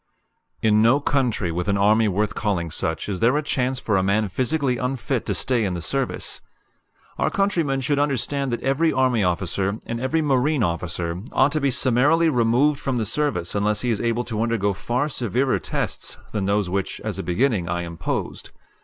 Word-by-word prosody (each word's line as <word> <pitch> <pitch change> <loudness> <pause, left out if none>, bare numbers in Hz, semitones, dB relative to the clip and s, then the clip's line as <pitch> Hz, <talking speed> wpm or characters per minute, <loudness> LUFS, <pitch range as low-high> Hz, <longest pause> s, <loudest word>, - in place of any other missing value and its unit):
In 110 -1 +4
no 120 +5 +5
country 125 -11 0
with 90 +3 -3
an 100 0 +2
army 105 +3 +4
worth 105 +2 0
calling 90 -7 -2
such 80 +1 -2
is 100 -3 -3
there 125 +5 +3
a 150 - -1
chance 130 -3 -1
for 105 -3 0
a - - +3
man 100 +2 +1
physically 130 - 0
unfit 125 -2 -2
to - - 0
stay 120 -3 +1
in 95 -3 -1
the - - -3
service. 135 +9 -3 0.8
Our - - +2
countrymen 165 -9 0
should 140 +2 0
understand 140 -1 -1
that 120 - -3
every 140 +5 +2
army 130 -4 +2
officer 95 +3 -1
and 115 0 -4
every 155 +5 0
marine 140 -1 +2
officer 85 -1 -2
ought 135 +2 +4
to 155 - -1
be 140 - +2
summarily 140 +7 +3
removed 125 +3 +2
from 130 -2 -2
the 110 - 0
service 115 - -1
unless 105 +1 +1
he 125 - 0
is 110 - -1
able 115 +1 0
to 110 -2 -3
undergo 115 -4 +1
far 125 +9 -1
severer 130 -1 0
tests - - -4
than 105 -3 -2
those 100 0 +1
which, 95 +1 -2
as - - -4
a - - 0
beginning, 100 -2 0
I 85 0 -1
imposed. 85 -1 -4
115 Hz, 190 wpm, -23 LUFS, 100-135 Hz, 0.8 s, no